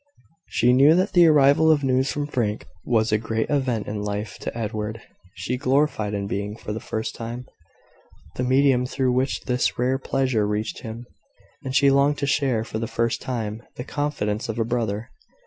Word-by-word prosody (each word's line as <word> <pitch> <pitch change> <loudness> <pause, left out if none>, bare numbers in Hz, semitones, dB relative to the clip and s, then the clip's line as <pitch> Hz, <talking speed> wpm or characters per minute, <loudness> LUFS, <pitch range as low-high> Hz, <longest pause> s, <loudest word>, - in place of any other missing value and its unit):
She 120 +1 +3
knew 140 +5 +6
that 185 +3 +1
the 175 -2 +7
arrival 150 +1 +5
of 145 -2 +2
news 130 0 +1
from 145 -1 -2
Frank 115 -7 -2 0.2
was 110 -2 +1
a 110 - +3
great 110 +3 -2
event 130 -6 0
in 105 0 -4
life 105 -1 -4
to - - -5
Edward. 110 0 -3 0.4
She 125 - -3
gloried 130 -6 +1
in 100 0 -2
being, 100 +1 -3
for 105 - -6
the 110 - -4
first 110 0 -4
time, 120 +2 -6 0.9
the - - -3
medium 130 -1 +3
through 130 -1 0
which 130 +2 0
this 125 -1 0
rare 130 +2 +1
pleasure 130 -6 0
reached 105 +1 -2
him; 115 +2 -8 0.6
and 130 0 -4
she 140 0 +5
longed 140 +1 +3
to 140 - -1
share, 135 -5 +1
for 110 -1 -5
the 115 - -2
first 115 +1 -1
time, 115 -4 -4
the 125 - -5
confidence 125 -8 -2
of 110 - -3
a 115 - +1
brother. 115 -1 -2
125 Hz, 185 wpm, -23 LUFS, 110-135 Hz, 0.9 s, the